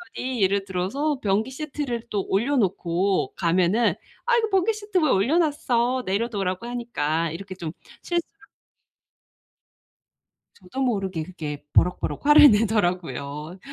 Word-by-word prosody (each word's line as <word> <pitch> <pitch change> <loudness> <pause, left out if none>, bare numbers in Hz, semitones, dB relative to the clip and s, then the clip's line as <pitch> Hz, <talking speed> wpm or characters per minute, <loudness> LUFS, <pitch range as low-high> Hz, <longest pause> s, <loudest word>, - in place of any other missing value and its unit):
남편이 255 -3 -3
예를 195 +1 +2
들어서 235 +11 -1
변기 210 +5 0
시트를 275 -4 -4
또 205 -4 -2
올려 235 +9 +1
놓고 190 -2 0
가면은 185 +6 +2 0.3
"아, 485 0 +3
이거 445 -2 +1
변기 390 +2 +2
시트 415 -2 -3
왜 310 -4 +2
올려 235 - +3
놨어? 255 -6 +1
내려놓으라고 195 -1 -2
하니까." 170 -10 -2
이렇게 190 +4 -7
좀 170 -4 -6 0.3
실수를 350 +4 -4 2.1
저도 205 +8 -7
모르게 195 -9 -1
그게 155 -4 -7
버럭버럭 180 +9 +1
화를 295 -1 +9
내더라고요. 175 - -1
205 Hz, 295 characters per minute, -24 LUFS, 180-265 Hz, 2.1 s, 화를